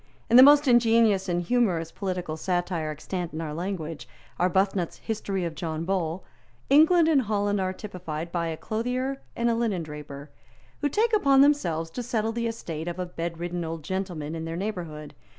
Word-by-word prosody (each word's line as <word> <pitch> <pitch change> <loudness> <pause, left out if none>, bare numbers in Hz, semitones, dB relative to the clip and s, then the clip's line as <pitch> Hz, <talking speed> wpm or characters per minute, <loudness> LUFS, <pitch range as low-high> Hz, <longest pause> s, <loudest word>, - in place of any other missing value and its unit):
In - - +5
the - - +11
most 290 +1 +7
ingenious 225 -5 +4
and 175 0 0
humorous 175 -7 +1
political 180 -5 -3
satire 175 -1 -1
extant 170 +3 -5
in 155 - -4
our 155 -2 -4
language, 165 -2 -4 0.3
Arbuthnot's 185 0 +1
History 200 -4 -3
of 165 - -3
John 160 0 -4
Bull, 180 -2 -1 0.5
England 320 +3 +6
and 300 -4 +4
Holland 205 -3 0
are 185 0 0
typified 175 -5 -6
by 170 -1 -1
a 160 -1 -4
clothier 250 +7 -2
and 235 - 0
a 235 - +3
linendraper, 150 -10 -4 0.5
who 290 - 0
take 445 - +1
upon 275 -10 +5
themselves 170 - +2
to 250 - -4
settle 225 -2 -1
the 235 0 -2
estate 170 -8 -5
of 175 0 -4
a 180 - -2
bedridden 175 0 -4
old 160 -1 -5
gentleman 175 -4 -4
in 165 0 -4
their 165 +1 -4
neighbourhood. 170 -7 -5
185 Hz, 170 wpm, -26 LUFS, 165-230 Hz, 0.5 s, the